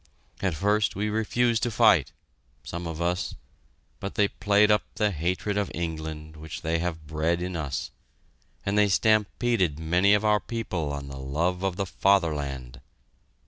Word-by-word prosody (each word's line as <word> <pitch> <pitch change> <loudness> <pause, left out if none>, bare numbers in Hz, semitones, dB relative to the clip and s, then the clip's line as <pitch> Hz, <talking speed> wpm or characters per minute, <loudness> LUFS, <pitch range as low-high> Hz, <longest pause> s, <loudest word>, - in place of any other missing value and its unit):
At 95 -5 0
first 105 +5 +1
we 105 +2 -1
refused 115 +2 +1
to 120 - +1
fight 110 - +4 0.5
some 85 0 -5
of 80 -1 -5
us 90 +1 -1 0.6
but 100 - -5
they 100 -1 +3
played 105 +1 +3
up 105 - +4
the 105 -1 +1
hatred 90 +5 -1
of 100 - -1
England 80 -2 -5
which 80 0 -8
they 80 +1 0
have 80 -2 -3
bred 80 +3 0
in 90 +1 -4
us; 75 -5 -3 0.7
and 100 +1 +2
they 105 -1 +4
stampeded 110 -4 +2
many 90 +6 +3
of 105 +1 0
our 105 0 +4
people 95 -10 -3
on 70 -1 -5
the 70 -1 -8
love 85 +7 -1
of 95 -2 0
the 100 +1 -1
Fatherland. 75 -10 0
90 Hz, 160 wpm, -26 LUFS, 80-105 Hz, 0.7 s, fight